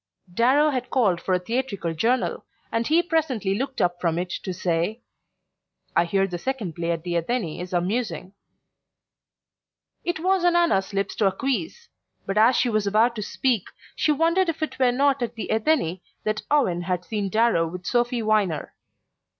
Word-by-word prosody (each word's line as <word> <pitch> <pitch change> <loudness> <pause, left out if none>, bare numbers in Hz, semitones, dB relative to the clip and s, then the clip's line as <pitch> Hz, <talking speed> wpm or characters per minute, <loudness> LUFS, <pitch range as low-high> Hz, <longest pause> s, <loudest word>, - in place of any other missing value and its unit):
Darrow 270 +8 +4
had 255 -2 -3
called 200 -10 +2
for 185 - +1
a - - +1
theatrical 200 -4 -2
journal, 235 +10 0 0.3
and 230 0 0
he 330 +3 +4
presently 275 - 0
looked 265 +6 -3
up 175 0 0
from 170 -2 +1
it 175 0 -3
to 185 - -4
say: 180 +5 -1 0.9
"I 170 - +4
hear 195 +3 +1
the 180 -2 -5
second 230 -7 -3
play 170 +1 -3
at 165 -1 -1
the 175 -1 -1
Athenee 170 -2 -2
is 180 - -7
amusing." 185 0 -2 1.7
It 345 -2 -2
was 375 +2 +1
on 350 -1 +4
Anna's 335 - +2
lips 195 -1 -1
to 205 - +3
acquiesce; 275 - -2 0.4
but 195 - -2
as 235 +4 +5
she 255 - +2
was 215 -3 0
about 225 +4 +3
to - - -2
speak 235 -1 0 0.3
she 310 - +2
wondered 335 +4 +2
if 320 -1 -2
it 260 -4 -4
were 255 -2 +4
not 275 +1 +2
at 235 -1 -3
the 225 - -5
Athenee 220 - +1 0.2
that 215 0 -1
Owen 220 -13 +2
had 180 0 -2
seen 205 -3 -2
Darrow 215 -5 +2
with 180 +2 -8
Sophy 240 +1 +1
Viner. 210 -7 0
220 Hz, 175 wpm, -24 LUFS, 180-265 Hz, 1.7 s, as